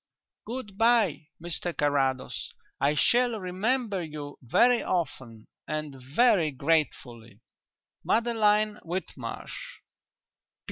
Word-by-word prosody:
"Good 220 -4 -6
bye, 225 -10 +3
Mr 175 0 -4
Carrados; 135 -3 0 0.3
I 145 +2 +2
shall 240 - +3
remember 200 +3 -1
you 150 -2 -8
very 240 - +4
often 130 -10 -3 0.2
and 155 -2 -4
very 160 - +3
gratefully. 130 -7 -1 0.6
"MADELINE 215 -2 +2
WHITMARSH. 190 - -6
175 Hz, 85 wpm, -28 LUFS, 145-225 Hz, 0.6 s, very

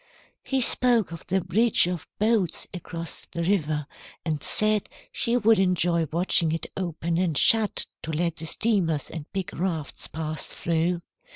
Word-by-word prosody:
"He 270 -1 0
spoke 240 -5 +3
of 165 - -9
the 190 +1 +1
bridge 210 +6 +3
of 175 -2 -4
boats 210 -5 +1
across 170 -2 -6
the 170 - -4
river, 155 -5 0 0.4
and 155 -3 -1
said 215 +4 +1 0.2
she 235 +1 +1
would 225 -2 +4
enjoy 175 -3 +2
watching 170 -1 +2
it 165 - -2
open 170 -2 -2
and 170 -5 +1
shut 220 +4 +4 0.2
to 160 - -5
let 170 +1 -1
the 160 - -4
steamers 165 - +1
and 160 -3 -7
big 195 0 -3
rafts 165 -5 -3
pass 155 -1 -4
through. 170 +1 0
175 Hz, 155 wpm, -26 LUFS, 160-200 Hz, 0.4 s, would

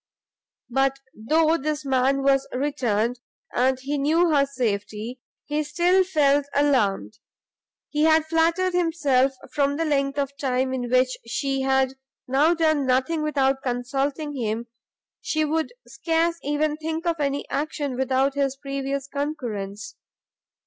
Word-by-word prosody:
But 270 +2 +2 0.2
though 315 +9 +2
this 300 0 -3
man 270 +1 +2
was 275 0 +3
returned, 245 -4 -1 0.3
and 260 +1 +2
he 280 +2 -2
knew 325 +4 +3
her 280 -1 +3
safety, 225 -1 -3 0.2
he 300 +1 -1
still 350 +5 +3
felt 290 -5 +2
alarmed; 215 - +1 0.7
he 300 +1 +2
had 315 0 +4
flattered 335 +3 +1
himself, 295 -7 +2 0.2
from 280 -1 +1
the 330 - 0
length 275 -2 0
of 280 -1 -2
time 260 -1 0
in 245 -2 -3
which 255 +1 +3
she 270 +3 -1
had 265 0 +2 0.3
now 290 +6 +3
done 310 -4 +2
nothing 260 +5 +1
without 275 -3 +1
consulting 270 +4 -2
him, 230 -2 -2 0.6
she 310 0 0
would 315 +4 -1 0.2
scarce 330 +4 0
even 295 +1 0
think 320 +1 -4
of 335 -1 0
any 280 -1 -1
action 290 -2 -2
without 265 +1 +1
his 275 -1 0
previous 275 -1 -3
concurrence. 240 -9 -5
275 Hz, 135 wpm, -24 LUFS, 260-305 Hz, 0.7 s, had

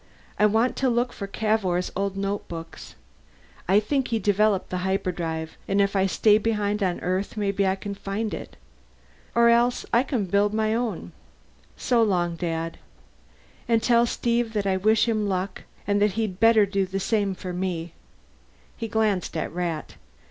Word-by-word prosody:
I 210 - +6
want 225 +4 +1
to 265 - +2
look 240 +1 0
for 200 - -6
Cavour's 195 -4 0
old 195 0 -2
notebooks; 195 -4 -5 0.7
I 195 +3 +5
think 265 +5 -1
he 230 - 0
developed 205 -2 +1
the 180 - -1
hyperdrive, 175 -4 -2
and 195 +1 +1
if 200 0 +2
I 195 0 +3
stay 210 +2 +4
behind 210 -2 -1
on 185 -3 0
Earth 185 +4 -2
maybe 200 -1 +1
I 190 - +2
can 200 +1 -6
find 200 +2 -4
it. - - -8 0.8
Or 235 0 +5
else 240 +1 +3
I 235 - +6
can 255 -6 -1
build 200 +3 +1
my 220 0 +1
own. 225 - -3 0.7
So 240 -2 +2
long, 175 -5 +1
Dad. 165 -1 -3 0.9
And 230 -1 +2
tell 235 -1 +4
Steve 235 -1 0
that 205 -2 -1
I 190 -1 +2
wish 215 +5 +3
him 215 -3 0
luck 185 0 -3 0.2
and 205 0 +1
that 205 -2 +3
he'd 210 -3 -2
better 225 -1 +6
do 195 -1 -1
the 195 +1 -3
same 200 -1 0
for 180 0 -6
me." 175 -2 -3 0.8
He 230 - -4
glanced 210 -6 0
at - - -3
Rat. 170 -3 -4
200 Hz, 170 wpm, -25 LUFS, 185-220 Hz, 0.9 s, I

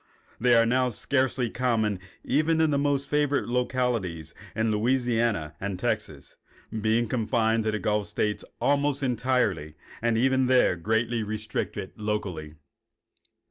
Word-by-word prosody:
They 120 0 +4
are 115 0 +5
now 125 +2 +2
scarcely 130 0 0
common 110 -5 0 0.2
even 155 +4 +2
in 160 -1 +3
the 140 - +2
most 140 -1 0
favored 145 -1 +1
localities 120 -10 -1 0.2
in 110 0 +1
Louisiana 115 - +1
and 100 -1 -3
Texas, - - -3 0.3
being 110 +2 +1
confined 110 -1 +1
to 110 - +1
the 110 - -1
gulf 105 -1 0
states 105 0 -1 0.2
almost 140 0 +1
entirely, 120 - 0 0.3
and 115 -1 +1
even 130 +1 +3
there 125 -7 +4
greatly 110 +6 0
restricted 110 0 -4
locally. 95 -8 -3
115 Hz, 130 wpm, -27 LUFS, 105-130 Hz, 0.3 s, are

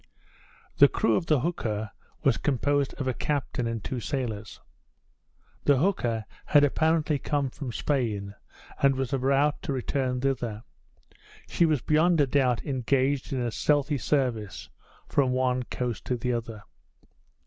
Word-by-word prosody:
The - - +9
crew 110 - +1
of 165 - -1
the 150 -5 +3
hooker 110 - -2 0.3
was - - +3
composed 145 0 0
of 140 - -4
a 130 - +1
captain 135 -3 -2
and 115 -3 -4
two 130 - -3
sailors. 115 -5 -4 1.1
The 140 -2 +5
hooker 120 - 0 0.2
had 145 -1 +5
apparently 155 +1 +2
come 140 -3 -1
from 135 -3 -6
Spain, 110 -8 -1 0.5
and 140 -1 +4
was 135 -1 -2
about 135 +2 +2
to 140 - -3
return 130 0 -1
thither. 120 -5 -2 0.8
She 170 - +2
was 150 -6 +1
beyond 160 +2 +3
a 145 - +5
doubt 130 -3 +1
engaged 135 +1 0
in 130 -2 -1
a 120 -1 -1
stealthy 145 +2 +1
service 115 - -1 0.4
from 130 -3 +2
one 130 0 +1
coast 125 -1 -4
to 125 - -1
the 125 +1 -1
other. 115 -2 -5
130 Hz, 145 wpm, -27 LUFS, 120-145 Hz, 1.1 s, The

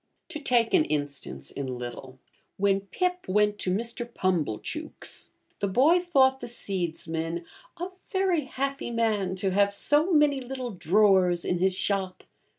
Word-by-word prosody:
To 320 -3 -5
take 245 -5 +2
an 355 -4 +6
instance 140 - -4
in 130 -3 -4
little: 125 +2 -8 0.4
when 195 0 +2
Pip 360 - -1
went 210 +2 +2
to - - -1
Mr. 235 +4 -3
Pumblechook's, 170 - -3 0.3
the 200 - 0
boy 280 - +4
thought 265 -7 +3
the - - -6
seedsman 170 -6 -3 0.3
'a 355 +2 -4 0.2
very 375 -6 +1
happy 275 0 -3
man 215 -5 0
to 190 0 0
have 200 +1 +3
so 295 - +2
many 295 -3 +4
little 255 -1 -5
drawers 185 -1 +3
in 180 - 0
his 190 0 +2
shop.' 190 -1 -1
200 Hz, 145 wpm, -27 LUFS, 180-265 Hz, 0.4 s, an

